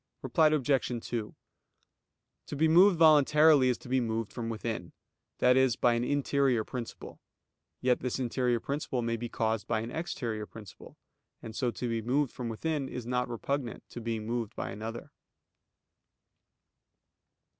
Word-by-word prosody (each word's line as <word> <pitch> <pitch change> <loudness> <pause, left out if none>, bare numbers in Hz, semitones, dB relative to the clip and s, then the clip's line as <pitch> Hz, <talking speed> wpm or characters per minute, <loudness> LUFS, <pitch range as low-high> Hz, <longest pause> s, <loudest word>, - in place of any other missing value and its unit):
Reply 145 +5 +4
Obj. 135 -5 0
2: 115 -3 -4 1.1
To - - -5
be 160 +3 +3
moved 175 +3 +6
voluntarily, 150 -3 +6
is 125 - +1
to - - -14
be 130 +1 +1
moved 115 -2 -3
from 115 -2 -4
within, 110 -5 -4 0.4
that 125 - +4
is, 130 -3 +3
by 120 - +3
an 120 0 0
interior 140 -3 +1
principle: 120 +1 -7 0.6
yet 125 -1 +2
this 125 -1 -2
interior 125 -1 0
principle 140 -2 -3
may 115 0 0
be 120 +1 -5
caused 110 -1 -1
by 110 -2 0
an 115 +2 -6
exterior 120 -10 -4
principle; 105 -5 -13 0.5
and 110 -1 -8
so 125 - 0
to 120 +2 -4
be 115 -1 -1
moved 130 +4 0
from 125 -2 -5
within 140 +4 -2
is 125 - -6
not 125 0 -1
repugnant 120 +1 -4
to 120 - -8
being 115 -1 -3
moved 115 -1 -3
by - - -4
another. 110 +3 -7
120 Hz, 155 wpm, -30 LUFS, 115-140 Hz, 1.1 s, moved